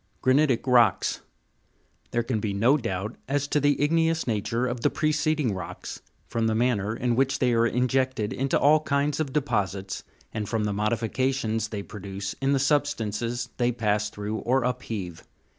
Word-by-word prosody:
Granitic 130 -2 +3
rocks. 125 -2 +3 0.9
There 120 - 0
can 115 -2 -1
be 105 -1 -2
no 120 +8 +4
doubt 110 -5 -3
as 145 +1 0
to 150 - +2
the 145 0 +2
igneous 165 +2 +2
nature 115 +2 -1
of 120 -1 -3
the - - +3
preceding 155 -5 +1
rocks, 95 - -7 0.3
from 115 -1 0
the 110 - +1
manner 110 -3 +1
in 120 0 0
which 135 +2 +2
they 125 -2 +2
are 115 0 +3
injected 125 -2 0
into 135 +1 +1
all 150 +2 +5
kinds 145 0 0
of 150 -4 -1
deposits, 100 -9 -1 0.3
and 105 -2 -3
from 110 -2 0
the 105 -1 0
modifications 115 +2 0
they 105 -2 -5
produce 100 -1 -6
in 135 0 +2
the 140 - +3
substances 120 -5 0
they 120 -1 +2
pass 105 -3 0
through 105 +1 -4
or 130 +3 +1
upheave. 110 -8 -4
120 Hz, 165 wpm, -26 LUFS, 105-135 Hz, 0.9 s, all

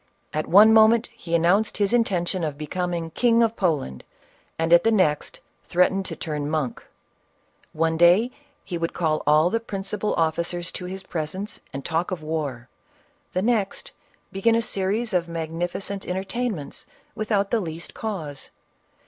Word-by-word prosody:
At 155 - -2
one 210 +4 +7
moment 220 +1 +5
he 170 -8 -3
announced 180 +6 +2
his 205 +1 +1
intention 185 -6 +1
of 150 -3 -3
becoming 170 +1 -3
King 235 +4 +3
of 230 0 +1
Poland, 150 - -1 0.5
and, 165 +1 +2
at 170 - +7
the 225 - +4
next, 185 -9 +1 0.3
threatened 190 +2 +2
to - - -5
turn 150 -3 -4
monk; 150 -6 -2 0.9
one 160 +1 0
day 180 +9 +5 0.3
he 175 -3 -5
would 165 0 -2
call 155 -3 0
all 155 +4 +5
the 230 - +1
principal 205 -1 -3
officers 170 +2 -1
to 180 - -6
his 190 +1 -6
presence, 180 +5 -4
and 135 0 -7
talk 165 +1 -1
of 180 -4 -4
war; 145 -6 -3 0.7
the 185 - 0
next, 220 -4 0 0.4
be 195 - -6
gin 230 +2 +4
a 230 - +2
series 205 +3 -1
of 175 -2 +1
magnificent 175 +4 -3
entertainments 190 - -3 0.3
without 210 -3 0
the 235 - +3
least 165 -3 -6
causo. 160 -11 -5
180 Hz, 155 wpm, -24 LUFS, 160-210 Hz, 0.9 s, one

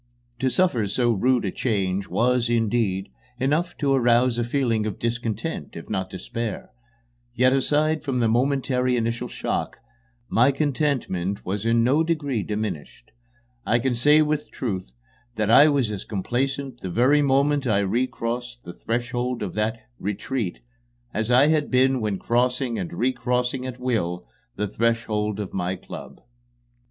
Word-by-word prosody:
To 130 - +2
suffer 125 - +2
so 120 +4 +1
rude 120 +2 +2
a 95 - -1
change 100 -5 -1
was, 125 0 +1
indeed, 115 -4 0 0.3
enough 150 +7 0
to 140 -2 +1
arouse 120 -1 +3
a - - +1
feeling 120 -3 0
of 105 - -4
discontent, 115 -1 -3
if - - -8
not 95 0 -2
despair; 110 +4 -5 0.6
yet, 125 +2 +4
aside 150 +3 +2
from 135 -4 -1
the 115 - +3
momentary 125 +1 +1
initial 115 0 -1
shock, - - -3 0.5
my 125 +5 +4
contentment 135 - -1
was 100 +4 -2
in 115 0 +3
no 140 +7 +3
degree 145 -8 -1
diminished. 105 - -5 0.5
I 120 - +2
can 125 +1 0
say 150 +6 +5
with 150 0 -2
truth 95 - -4 0.4
that 110 -1 +1
I 145 +6 +8
was 135 -7 +1
as 100 -3 -4
complacent 130 +5 -2
the 95 - -4
very 130 +10 +4
moment 140 0 +2
I 100 -3 +3
recrossed 120 +3 -2
the 85 - -8
threshold 120 +2 -2
of 95 - -4
that 110 +2 -1 0.2
"retreat" 105 +1 -3 0.5
as 110 +1 -1
I 125 +3 +6
had 155 -2 +1
been 130 0 +3
when 105 -3 -1
crossing 125 +2 0
and 170 - -4
recrossing 125 -2 -1
at 125 -1 -6
will 95 -9 -2 0.3
the 105 +1 -1
threshold 105 -1 0
of 100 -3 -5
my 90 0 -1
club. - - -10
120 Hz, 150 wpm, -24 LUFS, 105-130 Hz, 0.6 s, I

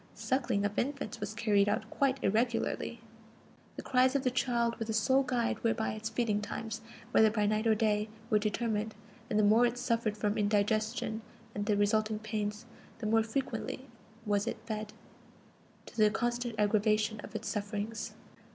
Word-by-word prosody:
Suckling 240 -6 0
of 205 +1 -1
infants 270 -5 -3
was 210 +1 -4
carried 205 -3 +3
out 205 - -1
quite 275 -1 +2
irregularly; 230 +1 0 0.7
the - - -6
cries 255 +1 +3
of 275 - +2
the 255 - +2
child 235 -2 0
were 225 - -1
the 220 - -1
sole 260 +5 +4
guide 245 -3 -1
whereby 225 -1 +1
its 215 +1 -4
feeding 220 -2 0
times, 225 +1 -5 0.3
whether 220 - +6
by 210 -1 +1
night 215 +2 +1
or 220 - +5
day, 210 0 +1 0.2
were 210 - +5
determined; 215 0 -1 0.3
and 210 - +1
the 215 - +4
more 215 +4 +6
it 240 0 +2
suffered 230 -3 0
from 210 0 0
indigestion 215 +2 +1 0.3
and 205 0 -3
the 210 -2 +3
resulting 215 +1 +2
pains, 210 0 -3 0.3
the 225 - -6
more 225 +1 +4
frequently 260 +2 -3 0.4
was 205 +1 +1
it 235 - -2
fed, 215 -1 -4 0.9
to - - -13
the 215 -2 +5
constant 240 +1 -1
aggravation 215 +1 +2
of 220 - -10
its 220 +1 -4
sufferings. 210 +1 -3
220 Hz, 170 wpm, -32 LUFS, 210-235 Hz, 0.9 s, whether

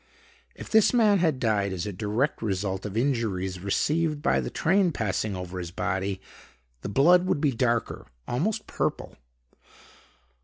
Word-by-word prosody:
If - - -9
this 220 +2 +5
man 210 -4 +4
had 160 -6 +1
died 105 -4 +1
as 90 -2 -3
a 105 - -4
direct 110 +8 -1
result 95 -2 -2
of 105 +1 -6
injuries 110 -8 -1
received 150 - 0
by 175 - +3
the - - -4
train 185 +2 +2
passing 105 -4 -2
over 90 0 -6
his 85 -1 -5
body, 95 +2 -2 0.6
the - - -5
blood 175 - +4
would 150 - +1
be 145 -1 +2
darker, 120 -1 -1 0.2
almost 180 - -1
purple. - - -3
115 Hz, 150 wpm, -26 LUFS, 95-155 Hz, 0.6 s, this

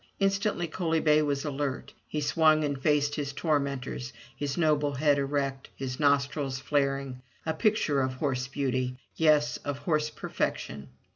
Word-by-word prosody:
Instantly 195 -2 +1
Coaly 165 0 0
bay 155 -1 +4
was 145 -1 -1
alert. 140 -2 -3
He 150 - -2
swung 155 +1 +4
and 140 -2 -2
faced 145 0 +2
his 145 -2 -3
tormentors, 140 -4 -1 0.2
his 140 +2 -3
noble 150 -3 +2
head 145 +1 +3
erect, 140 -1 -2
his 130 -1 -5
nostrils 140 -1 +1
flaring; 135 -2 -1 0.2
a 160 - 0
picture 160 -6 +2
of 130 0 -1
horse 130 -2 -1
beauty 130 -2 -1
— - - -48
yes, 150 -2 +3
of 145 -1 -4
horse 150 -1 0
perfection. 70 - -3
145 Hz, 150 wpm, -28 LUFS, 135-155 Hz, 0.2 s, bay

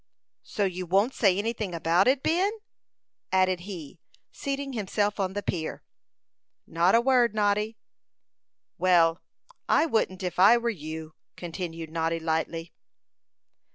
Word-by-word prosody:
"So 205 - -2
you 185 -1 -4
won't 200 +8 +2
say 195 -4 +3
anything 215 -3 -2
about 170 +4 +2
it, 265 +1 +2
Ben?" 360 +5 +2 0.8
added 185 -1 +2
he, 170 -3 -8 0.3
seating 275 0 -4
himself 205 -1 -1
on 190 -1 -1
the 205 0 -4
pier. 160 -3 -4 0.8
"Not 170 +5 +2
a 230 - +5
word, 245 -3 +3
Noddy." 210 +1 +1 1.0
"Well, 170 -2 +4 0.5
I 310 - +4
wouldn't 210 - -1
if 180 -1 -3
I 200 +6 +7
were 235 0 -1
you," 155 -3 -7 0.2
continued 165 -2 -6
Noddy, 165 0 -1
lightly. 165 +1 -2
185 Hz, 125 wpm, -27 LUFS, 165-220 Hz, 1.0 s, I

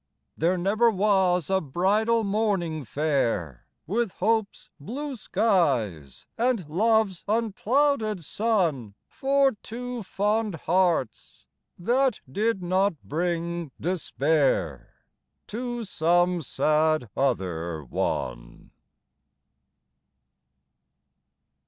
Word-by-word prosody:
There 175 +3 +1
never 210 +6 +3
was 190 -5 +2
a 190 0 +3
bridal 210 - +1
morning 195 -7 0
fair 115 - -1 0.2
With 220 +2 -1
hope's 220 +1 -1
blue 270 - -5
skies 145 - 0
and 235 -8 +1
love's 210 +2 +1
unclouded 225 - +1
sun 160 - 0
For 275 0 +2
two 245 +1 -6
fond 210 +1 -1
hearts, 170 - -1 0.3
that 245 +6 +1
did 205 - -1
not 185 +1 +1
bring 170 0 -2
despair 140 - -1 0.4
To 240 +1 -4
some 175 -1 +2
sad 155 0 +1
other 85 - -1
one. - - -4
185 Hz, 80 wpm, -26 LUFS, 150-220 Hz, 0.4 s, never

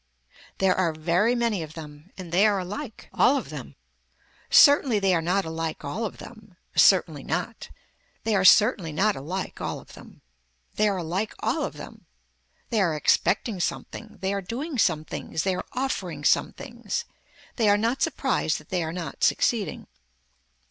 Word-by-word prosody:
There 190 -1 +3
are 170 -4 +1
very 175 +9 +1
many 230 -6 0
of 155 -1 -8
them. 150 +1 -11
And 180 -3 -8
they 195 +5 +5
are 205 -2 +2
alike, 205 +7 -6
all 280 - +4
of - - -5
them. - - -8 0.7
Certainly 285 -5 +6
they 195 -2 +2
are 165 - +2
not 185 +4 0
alike 160 0 -4
all 215 +11 -3
of 210 - -6
them. 215 -5 -13 0.2
Certainly 165 -6 +4
not. 180 +9 -4 0.5
They 225 - 0
are 190 - +2
certainly 195 -3 +5
not 200 +7 +1
alike 180 +8 -5
all - - -3
of - - -16
them. - - -15 0.5
They 215 0 +2
are 195 - -1
alike 180 +5 -3
all - - -1
of - - -3
them. - - -12 0.6
They 220 -3 +2
are 170 -5 +1
expecting 195 +6 +1
something, 215 +5 -5
they 190 +1 -1
are 200 - -2
doing 255 - -4
some 155 -6 +2
things, 160 - -4
they 190 - +1
are 185 - -4
offering 190 - -3
some - - +3
things. 240 - -5 0.5
They 220 -4 +3
are 205 - +5
not 230 +5 -1
surprised 265 - 0
that 155 - -14
they 180 -2 -1
are 160 -1 -3
not 170 -1 -6
succeeding. 225 -5 +1
195 Hz, 175 wpm, -25 LUFS, 165-225 Hz, 0.7 s, Certainly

